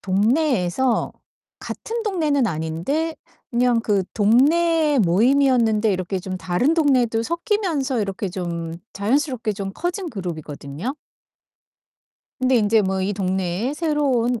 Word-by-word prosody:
동네에서 225 - +1 0.5
같은 460 +1 -5
동네는 310 - +1
아닌데 175 - -2 0.4
그냥 240 -1 +2
그 205 -3 +1
동네 300 +8 +3
모임이었는데 225 +2 +3
이렇게 185 +1 -2
좀 185 +1 -5
다른 185 - +1
동네도 255 -8 +2
섞이면서 335 - -1
이렇게 200 0 -3
좀 170 -2 -4 0.2
자연스럽게 240 +2 0
좀 195 -1 -5
커진 355 +1 -3
그룹이거든요. 165 - -5 1.5
근데 255 0 +3
인제 215 -1 +3
뭐 190 0 -1
이 190 +2 -1
동네에 190 +4 -1
새로 300 -3 0
온 240 -1 +1
230 Hz, 275 characters per minute, -22 LUFS, 190-285 Hz, 1.5 s, 동네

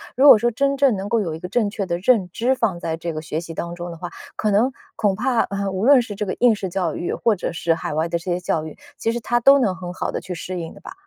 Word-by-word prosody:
如 270 +3 +5
果 255 -6 +10
说 240 +2 +2
真 275 +4 0
正 275 -4 +3
能 195 +1 -4
够 230 +1 +1
有 170 -7 -2
一 - - -8
个 180 - -6
正 210 +2 +1
确 200 -1 -3
的 175 -1 -2
认 195 -4 +2
知 245 +7 +1
放 210 -8 0
在 160 -1 -3
这 170 0 -4
个 155 - -4
学 155 0 -3
习 165 0 -8
当 170 +1 -5
中 175 0 -6
的 170 - -9
话， 175 +1 -6 0.3
可 215 - 0
能 220 +6 +3 0.2
恐 205 -3 +1
怕， 240 +2 +1
呃， 200 -1 -2
无 190 +3 -2
论 275 -1 +7
是 220 -4 -6
这 210 +1 -3
个 190 - -3
应 240 -3 +5
试 195 - -4
教 180 -4 -2
育 175 - -3
或 225 -2 +1
者 180 - -4
是 165 0 +1
海 165 - -4
外 160 +2 0
的 170 - 0
这 165 - -11
些 175 - 0
教 160 -3 -1
育， 155 - -8 0.2
其 225 - 0
实 240 - -2
她 240 +1 0
都 275 +4 +6
能 205 -8 +1
很 180 -1 -7
好 - - -3
地 - - -3
去 180 - -7
适 180 +1 -5
应 165 -1 -6
的 - - -15
吧。 - - -9
195 Hz, 335 characters per minute, -22 LUFS, 170-235 Hz, 0.3 s, 果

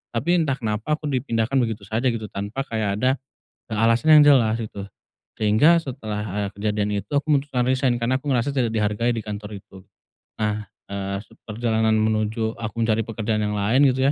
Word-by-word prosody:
tapi 175 +10 +2
entah 145 -5 +1
kenapa 110 +4 -2
aku 155 - -35
dipindahkan 125 0 0
begitu 115 -4 -2
saja 110 +6 -1
gitu 115 -3 -1
tanpa 105 +7 -4
kayak 110 -6 -2
ada, 130 +1 +4 0.6
eee, 110 - -1
alasan 115 +7 +5
yang - - +8
jelas 115 -2 +2
gitu 105 -3 -6 0.6
sehingga 110 +11 +5
setelah, 110 -7 -5 0.2
eee, - - -4
kejadian 105 0 -1
itu 100 - -24
aku 145 - 0
memutuskan 135 -3 0
resign 130 -1 +2
karena 120 +2 +1
aku 150 - -4
ngerasa 125 +2 +1
tidak 120 -4 +1
dihargai 105 +2 +1
di - - -2
kantor 105 0 -6
itu, 95 0 -16 0.6
nah, 105 0 -1 0.2
eee, 100 0 -3
seperjalanan 110 0 -1
menuju 110 +1 0
aku 110 -2 -4
mencari 115 -1 +2
pekerjaan 110 -1 -2
yang 105 0 -1
lain 105 +6 +2
gitu 130 +2 +2
110 Hz, 180 wpm, -23 LUFS, 105-130 Hz, 0.6 s, yang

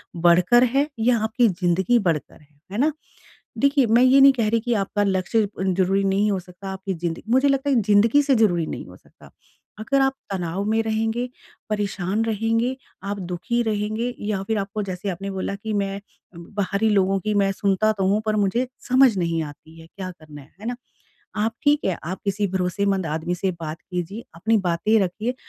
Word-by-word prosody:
बढ़कर 175 +8 +5
है 275 +4 +2
या 235 +1 +3
आपकी 220 +2 +2
ज़िन्दगी 185 +5 +1
बढ़कर 160 -6 -2
है, 145 -1 -26
है 205 - -4
ना? 295 +6 +3 0.7
देखिए 280 -2 +3
मैं 230 +3 +4
ये 260 +2 +6
नहीं 275 0 +9
कह 230 -4 0
रही 230 0 +2
कि 240 +1 -1
आपका 205 0 0
लक्ष्य 200 +2 +1
ज़रूरी 190 +1 +1
नहीं 195 +2 +2
हो 195 - 0
सकता, 180 +2 -12
आपकी 190 0 -4
ज़िन्दगी 170 +6 -4
मुझे 265 +3 +4
लगता 275 +1 +1
है 275 - +3
कि 230 - +3
ज़िन्दगी 230 +8 +5
से 275 -2 +3
ज़रूरी 175 -7 +2
नहीं - - -6
हो - - -13
सकता। - - -19 0.5
अगर 275 +6 +1
आप 270 0 +2 0.2
तनाव 180 0 -2
में 225 0 +2
रहेंगे, 225 +3 -1 0.4
परेशान 205 0 -1
रहेंगे, 225 +3 0 0.3
आप 200 0 -4
दुःखी 185 +7 -2
रहेंगे 215 +2 -2
या 205 -2 -2
फिर 220 +1 -1
आपको 205 +1 -3
जैसे 190 +1 -4
आपने 195 +2 -4
बोला 190 +1 -3
कि 215 +2 -5
मैं 200 0 -2 0.4
बाहरी 200 +4 -1
लोगों 195 -1 +2
की 210 +3 -2
मैं 200 -1 +2
सुनता 200 +2 +1
तो 190 -1 +1
हूँ 210 +2 +2
पर 215 0 +1
मुझे 210 +5 +1 0.2
समझ 255 -3 +5
नहीं 170 -2 0
आती 155 +2 -12
है 165 - -14
क्या 185 0 -7
करना 155 -4 -13
है। 140 - -19
है - - -9
ना? 245 - -2 0.6
आप 220 +2 0
ठीक 295 +1 +3
है, 185 -3 0
आप 185 +4 -5
किसी 200 +1 0
भरोसेमंद 190 0 0
आदमी 160 +3 -2
से 190 +2 -1
बात 160 +1 -5
कीजिए, 180 +5 -4
अपनी 220 +7 +1
बातें 190 +5 +2
रखिए। 215 +7 -2
200 Hz, 195 wpm, -23 LUFS, 185-225 Hz, 0.7 s, नहीं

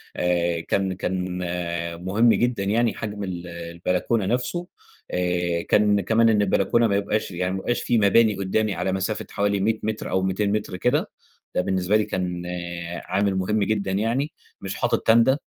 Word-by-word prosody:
آآ 85 -1 +1
كان 95 +2 0
كان 90 -1 -3 0.7
مهم 110 +6 +3
جدًا 120 -5 0
يعني 115 +3 +2
حجم 105 -2 -5
ال 90 -2 -5
البلكونة 85 +5 -2
نفسه 125 - -1 0.4
آآ، 90 -1 0
كان 105 -1 +4
كمان 115 +4 +3
إن 105 -2 +3
البلكونة 105 +4 +2
ما 100 - +1
يبقاش 100 0 -1
يعني 90 +1 -2
ما 95 - -2
يبقاش 120 +5 -1
في 120 - +2
مباني 110 +1 +4
قدامي 100 +2 0
على 95 - -1
مسافة 95 +3 -2
حوالي 100 0 0
100 110 +3 +1
متر 110 0 -3
أو 95 - +1
200 95 +2 0
متر 105 -3 -2
كده، 125 +6 +1 0.5
ده - - +3
بالنسبة 95 +2 0
لي 105 - +1
كان 90 -1 -3 0.6
عامل 100 +1 +1
مهم 100 +3 +1
جدًا 100 -2 -1
يعني، 115 +9 0 0.3
مش 95 0 -5
حاطط - - +1
تاندا 115 +5 +5
100 Hz, 165 wpm, -24 LUFS, 90-110 Hz, 0.7 s, تاندا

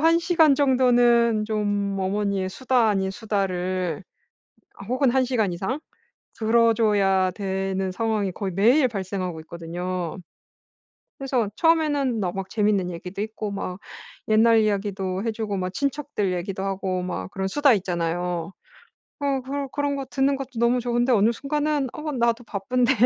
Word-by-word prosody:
1 330 +2 +5
시간 335 -4 +4
정도는 240 -4 +4
좀 205 -2 -1
어머니의 195 0 -1
수다 250 +2 +1
아닌 195 -2 0
수다를 185 -5 -2 0.9
혹은 255 +1 +2
1 260 +1 +2
시간 225 -7 0
이상 190 - -2 0.6
들어 230 +1 +4
줘야 195 -4 +2
되는 190 -1 -2
상황이 210 -1 -1
거의 190 +1 -4
매일 245 - +4
발생하고 185 -5 -4
있거든요. 170 +2 -5 1.0
그래서 255 -6 0
처음에는 295 -7 +2
너 180 -2 -1
막 195 0 -5
재밌는 205 -4 +1
얘기도 180 +3 -6
있고 215 -1 -4
막 185 -2 -4 0.5
옛날 225 +1 +5
이야기도 195 -3 -1
해 230 - 0
주고 215 -2 -3
막 185 -1 -3
친척들 280 -4 -2
얘기도 190 +2 -3
하고 190 -1 -2
막 185 0 -4
그런 190 -1 -3
수다 290 +4 +4
있잖아요. 175 -2 -2 0.7
어 280 -2 0
그런 275 +2 -4
그런 285 -1 -1
거 275 - -4
듣는 270 +1 +1
것도 265 -3 -6
너무 235 +1 +3
좋은데 240 +1 +1
어느 220 -1 +4
순간은 290 +2 -1
'어 305 0 -4
나도 235 -1 +1
바쁜데 240 +6 0
215 Hz, 300 characters per minute, -24 LUFS, 190-255 Hz, 1.0 s, 1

